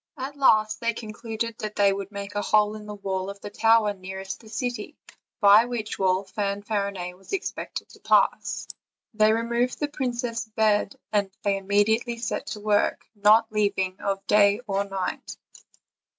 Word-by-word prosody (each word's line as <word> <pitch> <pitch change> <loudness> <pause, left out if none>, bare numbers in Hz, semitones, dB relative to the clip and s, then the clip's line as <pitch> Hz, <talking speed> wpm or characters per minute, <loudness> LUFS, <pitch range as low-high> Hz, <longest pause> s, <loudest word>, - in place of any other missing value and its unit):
At 270 +2 -5
last 215 -6 +3
they 235 -2 -1
concluded 225 0 -5
that 215 0 -5
they 200 -1 +4
would 195 0 -5
make 200 0 -6
a 205 - -1
hole 210 0 +3
in 210 -1 -9
the 210 - -6
wall 190 -1 -3
of 200 0 -8
the 205 - -7
tower 225 -1 +4
nearest 190 0 -7
the 220 - -15
city, 245 +2 -4 0.4
by 205 +2 +7
which 235 -3 -4
wall 190 0 +2
Fanfarinet 200 -2 -3
was 195 - -13
expected 390 - -4
to - - -16
pass. - - +2 0.5
They 215 0 +4
removed 235 +2 0
the 295 - 0
princess' 240 -4 -3
bed, 215 +3 +2 0.2
and 205 -2 +1
they 200 - +2
all 195 - -1
immediately 210 +4 +1
set 230 - -3
to 210 - -5
work, 205 -1 +1
not 215 +2 +4
leaving 200 -3 0
off 195 -1 -2
day 205 +1 +4
or 200 -2 0
night. 195 -2 -4
210 Hz, 165 wpm, -25 LUFS, 200-225 Hz, 0.5 s, by